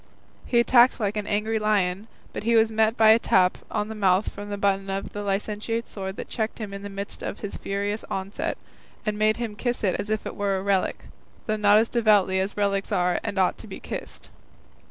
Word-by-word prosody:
He 240 Hz, -, +3 dB
attacked 240 Hz, +1 st, +5 dB
like 205 Hz, -1 st, -1 dB
an 210 Hz, -1 st, -3 dB
angry 215 Hz, +2 st, 0 dB
lion, 205 Hz, -1 st, 0 dB, 0.3 s
but -, -, -4 dB
he 230 Hz, +2 st, +2 dB
was 225 Hz, 0 st, +4 dB
met 220 Hz, +1 st, +2 dB
by 220 Hz, -1 st, +6 dB
a 220 Hz, +1 st, +7 dB
tap 185 Hz, -4 st, +3 dB
on 210 Hz, -, -2 dB
the 220 Hz, -, -6 dB
mouth 195 Hz, -2 st, +2 dB
from 205 Hz, 0 st, -9 dB
the 205 Hz, -, -3 dB
button 195 Hz, -1 st, 0 dB
of 195 Hz, 0 st, -4 dB
the 205 Hz, -, -4 dB
licentiate's 210 Hz, +3 st, -2 dB
sword 190 Hz, -1 st, -5 dB
that -, -, -6 dB
checked 220 Hz, -1 st, -3 dB
him 210 Hz, -3 st, -6 dB
in 200 Hz, -, -6 dB
the 200 Hz, -, -6 dB
midst 200 Hz, 0 st, -5 dB
of -, -, -5 dB
his 205 Hz, -, -5 dB
furious 200 Hz, +2 st, -3 dB
onset, 200 Hz, +12 st, -3 dB, 0.5 s
and 215 Hz, -1 st, 0 dB
made 215 Hz, +1 st, +2 dB
him 230 Hz, -3 st, -4 dB
kiss 240 Hz, +1 st, -2 dB
it 190 Hz, -3 st, +1 dB
as 210 Hz, -, -4 dB
if 215 Hz, -1 st, -1 dB
it -, -, -5 dB
were 200 Hz, -1 st, 0 dB
a 190 Hz, -, -4 dB
relic, 195 Hz, -1 st, 0 dB, 0.4 s
though 215 Hz, -, 0 dB
not 210 Hz, -1 st, +5 dB
as 225 Hz, +1 st, +3 dB
devoutly 210 Hz, -6 st, +3 dB
as 195 Hz, +2 st, -2 dB
relics 200 Hz, -1 st, 0 dB
are 180 Hz, -2 st, +1 dB
and 200 Hz, -, -4 dB
ought 185 Hz, -1 st, +2 dB
to -, -, -9 dB
be -, -, -8 dB
kissed. -, -, -8 dB
205 Hz, 225 wpm, -25 LUFS, 195-220 Hz, 0.5 s, a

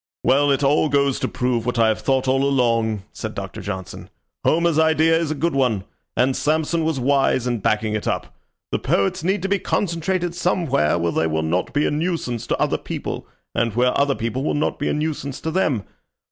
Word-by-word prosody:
"Well, 145 Hz, +2 st, +4 dB
it 140 Hz, 0 st, +2 dB
all 150 Hz, +2 st, +3 dB
goes 140 Hz, -1 st, +2 dB
to -, -, -1 dB
prove 125 Hz, -2 st, -1 dB
what 125 Hz, 0 st, -2 dB
I 115 Hz, -1 st, +4 dB
have 110 Hz, -, -1 dB
thought 135 Hz, -1 st, +1 dB
all 135 Hz, +1 st, +2 dB
along," 115 Hz, -6 st, +1 dB
said -, -, -6 dB
Doctor -, -, -6 dB
Johnson. 95 Hz, -2 st, -6 dB, 0.3 s
"Homer's 165 Hz, -1 st, +2 dB
idea 160 Hz, 0 st, +4 dB
is 165 Hz, -2 st, 0 dB
a 155 Hz, -, -1 dB
good 170 Hz, +4 st, 0 dB
one, 125 Hz, -8 st, +1 dB, 0.3 s
and 130 Hz, +1 st, +3 dB
Samson 160 Hz, +2 st, 0 dB
was 160 Hz, -3 st, 0 dB
wise 135 Hz, -1 st, +2 dB
in 120 Hz, -2 st, -1 dB
backing 110 Hz, +1 st, 0 dB
it 105 Hz, -, -2 dB
up. -, -, -3 dB, 0.4 s
The -, -, 0 dB
poets 100 Hz, +10 st, 0 dB
need 190 Hz, +2 st, 0 dB
to -, -, 0 dB
be 200 Hz, 0 st, +1 dB
concentrated 175 Hz, 0 st, -1 dB
somewhere 165 Hz, -, +1 dB
where 85 Hz, 0 st, 0 dB
they 80 Hz, -, +1 dB
will 80 Hz, 0 st, -1 dB
not 85 Hz, +3 st, -1 dB
be 145 Hz, -, +1 dB
a -, -, +1 dB
nuisance 150 Hz, -7 st, -2 dB
to -, -, 0 dB
other -, -, +1 dB
people, -, -, -5 dB, 0.3 s
and 115 Hz, -3 st, 0 dB
where 125 Hz, +1 st, +2 dB
other 140 Hz, -1 st, +2 dB
people 115 Hz, +4 st, -3 dB
will -, -, 0 dB
not 150 Hz, -, -1 dB
be 145 Hz, -, 0 dB
a -, -, 0 dB
nuisance 150 Hz, -3 st, -3 dB
to 160 Hz, -, -2 dB
them. 150 Hz, -, +1 dB
140 Hz, 210 wpm, -22 LUFS, 115-160 Hz, 0.4 s, Well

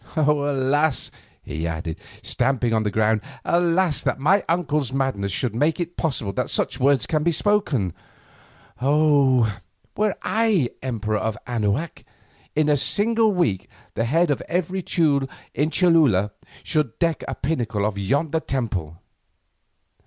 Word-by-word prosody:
Alas!" 145 Hz, -1 st, +1 dB, 0.3 s
he 80 Hz, +3 st, -4 dB
added, 80 Hz, 0 st, -4 dB, 0.2 s
stamping 125 Hz, -2 st, 0 dB
on 110 Hz, -, +2 dB
the 105 Hz, -, 0 dB
ground, 110 Hz, +1 st, +1 dB, 0.2 s
"alas! 170 Hz, -1 st, +2 dB
that -, -, -1 dB
my 180 Hz, +9 st, +3 dB
uncle's 150 Hz, -6 st, 0 dB
madness 130 Hz, -8 st, -1 dB
should 120 Hz, +1 st, -1 dB
make 150 Hz, +8 st, +1 dB
it 175 Hz, 0 st, -4 dB
possible 120 Hz, -, -2 dB
that -, -, -2 dB
such -, -, -1 dB
words 140 Hz, +1 st, +3 dB
can 155 Hz, -2 st, 0 dB
be 170 Hz, +3 st, +2 dB
spoken. 155 Hz, -, +1 dB, 0.9 s
Oh! 135 Hz, -6 st, +3 dB, 0.4 s
were 210 Hz, -1 st, +1 dB
I 215 Hz, -, +1 dB
emperor 110 Hz, -4 st, -2 dB
of 110 Hz, 0 st, -2 dB
Anahuac, 120 Hz, +6 st, -2 dB, 0.5 s
in 155 Hz, 0 st, +2 dB
a 150 Hz, -1 st, +3 dB
single 220 Hz, -, +3 dB
week 145 Hz, -, 0 dB, 0.2 s
the 115 Hz, -, -1 dB
head 165 Hz, +6 st, +2 dB
of 140 Hz, -, -1 dB
every 180 Hz, +2 st, -1 dB
Teule 145 Hz, -6 st, +1 dB, 0.2 s
in 150 Hz, +2 st, 0 dB
Cholula 155 Hz, -, +3 dB, 0.3 s
should 150 Hz, -7 st, -1 dB
deck 165 Hz, -3 st, 0 dB
a -, -, -3 dB
pinnacle 120 Hz, -8 st, -1 dB
of 105 Hz, -2 st, -1 dB
yonder 145 Hz, +10 st, 0 dB
temple." 100 Hz, -, -3 dB
140 Hz, 140 wpm, -23 LUFS, 110-165 Hz, 0.9 s, my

